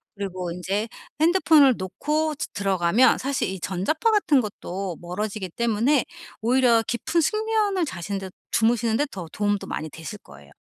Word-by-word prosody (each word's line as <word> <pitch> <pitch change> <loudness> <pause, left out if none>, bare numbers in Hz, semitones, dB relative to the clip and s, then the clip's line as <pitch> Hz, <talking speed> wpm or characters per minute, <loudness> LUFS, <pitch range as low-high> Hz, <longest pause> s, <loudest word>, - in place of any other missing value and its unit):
그리고 185 -3 -4
인제 195 +5 -2 0.3
핸드폰을 315 -6 +5
놓고 300 +11 -1
드 - - -4
들어가면 195 +3 +3
사실 275 +1 -1
이 190 -1 -5
전자파 200 - 0
같은 345 -10 +3
것도 195 -4 -5
멀어지기 190 +2 -4
때문에 235 - +1 0.4
오히려 235 -1 +4
깊은 240 +8 0
숙면을 430 -2 +1
자시는데 195 - -5 0.2
주무시는데 230 +3 +2
더 180 -4 -7
도움도 205 -1 -1
많이 155 - -4
되실 165 +8 -8
거예요. 70 - -16
220 Hz, 345 characters per minute, -24 LUFS, 190-285 Hz, 0.4 s, 핸드폰을